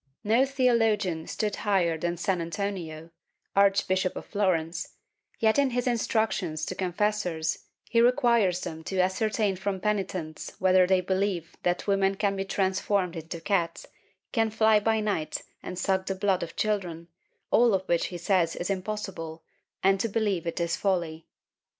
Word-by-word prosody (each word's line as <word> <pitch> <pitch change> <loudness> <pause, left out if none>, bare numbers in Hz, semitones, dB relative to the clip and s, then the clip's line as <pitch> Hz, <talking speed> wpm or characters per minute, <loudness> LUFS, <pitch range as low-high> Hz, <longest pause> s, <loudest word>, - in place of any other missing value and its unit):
No 230 +6 +3
theologian 225 -10 +1
stood 210 -2 -2
higher 190 -6 +1
than 175 +2 -2
St. 185 -1 0
Antonino, 170 -3 -4 0.4
Arch 200 0 +4
bishop 185 0 0
of - - -6
Florence, 180 -5 -1 0.4
yet 220 +4 +3
in 280 -1 +3
his 245 0 -1
instructions 220 -9 0
to - - -4
confessors, 180 -3 -1 0.2
he 230 - +3
requires 235 -7 +3
them 160 -2 -6
to 190 - -3
ascertain 200 +2 +1
from 190 +1 -2
penitents 185 -6 -3
whether 185 -1 +4
they 185 0 +3
believe 190 -2 -1
that 175 0 0
women 195 -1 +2
can 200 0 0
be 195 0 -2
transformed 190 -1 0
into 165 +1 -6
cats, 175 -2 -1 0.5
can 225 -2 +2
fly 220 0 +4
by 220 +1 +1
night 200 -7 -2 0.2
and 180 - -7
suck 190 +1 0
the 195 - -1
blood 190 -1 +1
of 170 - -6
children, 180 -6 -2 0.4
all 235 -3 +5
of 190 0 -3
which 170 -1 +1
he 180 - -6
says 175 -1 +1
is 175 +3 -2
impossible, 185 -5 -4 0.4
and 195 0 +4
to 230 - 0
believe 200 -5 0
it 170 - -3
is 170 0 0
folly. 170 -5 -1
190 Hz, 155 wpm, -27 LUFS, 175-210 Hz, 0.5 s, all